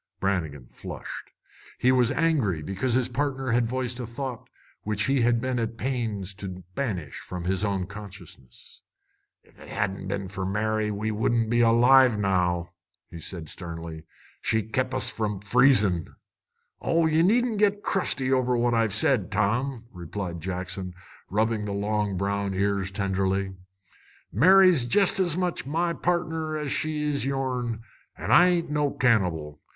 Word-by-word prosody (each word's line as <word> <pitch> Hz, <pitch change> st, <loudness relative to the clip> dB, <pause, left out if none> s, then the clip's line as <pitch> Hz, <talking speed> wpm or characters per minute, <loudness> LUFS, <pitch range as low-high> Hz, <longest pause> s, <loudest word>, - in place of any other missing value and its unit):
Brannigan 80 Hz, -9 st, -2 dB
flushed. -, -, -8 dB, 0.5 s
He 125 Hz, -, +3 dB
was 125 Hz, -2 st, +3 dB
angry 135 Hz, -, +1 dB
because 100 Hz, +8 st, -1 dB
his 130 Hz, -2 st, +2 dB
partner 135 Hz, -1 st, -2 dB
had 120 Hz, 0 st, +2 dB
voiced 125 Hz, 0 st, -3 dB
a 120 Hz, -, -4 dB
thought 125 Hz, 0 st, -6 dB, 0.3 s
which 105 Hz, -1 st, -1 dB
he 135 Hz, +1 st, +2 dB
had 120 Hz, 0 st, +3 dB
been 130 Hz, 0 st, -1 dB
at 115 Hz, 0 st, -3 dB
pains 115 Hz, -7 st, -3 dB
to 95 Hz, -2 st, -6 dB
banish 90 Hz, -, -3 dB
from 90 Hz, -1 st, -7 dB
his 95 Hz, +3 st, 0 dB
own 100 Hz, -3 st, 0 dB
consciousness. 100 Hz, -, -12 dB, 0.6 s
"Ef -, -, -24 dB
it -, -, -13 dB
hadn't 100 Hz, -1 st, -2 dB
a' -, -, -6 dB
been 100 Hz, 0 st, -3 dB
fer 95 Hz, 0 st, -5 dB
Mary, 105 Hz, +2 st, 0 dB
we 105 Hz, +1 st, -2 dB
wouldn't 115 Hz, +1 st, 0 dB
be 120 Hz, 0 st, +3 dB
alive 120 Hz, +1 st, +6 dB
now," 90 Hz, -3 st, 0 dB, 0.5 s
said 85 Hz, +1 st, -7 dB
he -, -, -13 dB
sternly. 85 Hz, -2 st, -7 dB, 0.4 s
"She's 110 Hz, 0 st, -1 dB
kep' 130 Hz, +2 st, 0 dB
us 130 Hz, -, 0 dB
from 105 Hz, -3 st, -2 dB
freezin'." 105 Hz, -, +3 dB, 0.7 s
"Oh, 165 Hz, 0 st, +2 dB
ye 160 Hz, 0 st, +3 dB
needn't 225 Hz, +4 st, +2 dB
git 205 Hz, 0 st, +2 dB
crusty 135 Hz, -9 st, 0 dB
over 125 Hz, -2 st, +2 dB
what 120 Hz, 0 st, +1 dB
I've 115 Hz, -3 st, +2 dB
said, 110 Hz, -3 st, +2 dB
Tom," 115 Hz, +5 st, 0 dB
replied 85 Hz, -1 st, -6 dB
Jackson, 95 Hz, 0 st, -4 dB, 0.3 s
rubbing 110 Hz, +1 st, 0 dB
the 100 Hz, -, -3 dB
long 105 Hz, -1 st, -1 dB
brown 100 Hz, 0 st, -1 dB
ears 100 Hz, 0 st, 0 dB
tenderly. 95 Hz, -1 st, -1 dB, 0.8 s
"Mary's 180 Hz, -, +6 dB
jest 195 Hz, -, +3 dB
as 175 Hz, -3 st, +2 dB
much 180 Hz, -6 st, -2 dB
my 170 Hz, +3 st, 0 dB
pardner 160 Hz, -3 st, -1 dB
as 150 Hz, -3 st, -3 dB
she 155 Hz, -1 st, -1 dB
is 145 Hz, -1 st, -1 dB
yourn, 125 Hz, -4 st, -2 dB, 0.3 s
an' -, -, -4 dB
I 175 Hz, -, +7 dB
ain't 170 Hz, -3 st, 0 dB
no 150 Hz, -1 st, +1 dB
cannibal. 90 Hz, -, 0 dB
110 Hz, 155 wpm, -26 LUFS, 95-135 Hz, 0.8 s, I